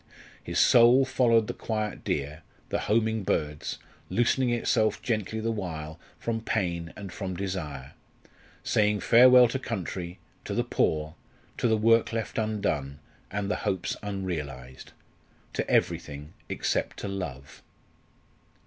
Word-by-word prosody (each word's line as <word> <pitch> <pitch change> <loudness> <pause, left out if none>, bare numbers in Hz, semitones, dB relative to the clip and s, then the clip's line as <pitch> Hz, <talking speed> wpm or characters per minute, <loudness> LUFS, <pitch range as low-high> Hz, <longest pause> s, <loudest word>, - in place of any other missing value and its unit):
His - - -4
soul 120 +3 +6
followed 115 -4 +3
the - - -4
quiet 110 -2 -3
deer, 75 +3 -2 0.3
the - - 0
homing 110 0 +2
birds, 75 -4 -2 0.3
loosening 120 +2 +2
itself 115 -2 +1
gently 110 -2 -1
the 115 +1 -1
while 80 -7 -5 0.2
from 115 -1 -2
pain 85 -7 -2
and 100 -3 -8
from 95 -3 -4
desire, 80 -9 -4 0.7
saying 105 -1 +2
farewell 125 +1 +7
to 135 - -2
country, 90 -6 -4 0.3
to - - -3
the - - +2
poor, 75 0 0 0.5
to - - +2
the 110 -1 +3
work 115 +1 +4
left 115 0 -3
undone, 100 -11 -1 0.3
and 100 +1 -2
the - - 0
hopes 95 -2 -2
unrealised 75 -11 -5 0.6
to - - -2
everything 75 +2 0 0.2
except - - -1
to - - -3
love. 80 -9 -6
100 Hz, 130 wpm, -27 LUFS, 80-115 Hz, 0.7 s, farewell